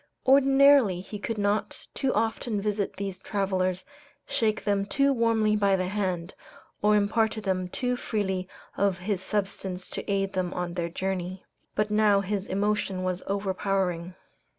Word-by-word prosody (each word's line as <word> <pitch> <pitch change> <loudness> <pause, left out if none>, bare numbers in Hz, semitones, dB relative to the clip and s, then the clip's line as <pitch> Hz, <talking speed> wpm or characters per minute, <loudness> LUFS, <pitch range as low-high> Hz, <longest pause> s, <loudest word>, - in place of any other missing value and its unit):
Ordinarily 270 -6 +6
he 205 +3 -7
could 225 +2 -3
not 205 +1 -1
too 270 -2 0
often 225 -1 0
visit 205 0 -1
these 195 -1 -4
travelers, 190 -2 -1 0.4
shake 215 -2 0
them 200 -1 +1
too 275 +7 +2
warmly 225 -3 +2
by 200 -2 +3
the 185 -1 -1
hand, 185 -3 -2 0.5
or 210 0 +4
impart 215 +2 +2
to 220 - -5
them 185 -2 -1
too 250 +6 -1
freely 190 -6 -2 0.3
of 195 -2 +1
his 190 0 -2
substance 190 -2 -3
to - - -4
aid 195 -1 0
them 185 -1 -2
on 175 -1 -3
their 170 -1 -2
journey. 185 +1 -3 0.3
But 210 0 0
now 210 -2 +4
his 200 0 -3
emotion 200 -1 0
was 185 0 -1
overpowering. 190 -3 -1
200 Hz, 150 wpm, -27 LUFS, 185-215 Hz, 0.5 s, Ordinarily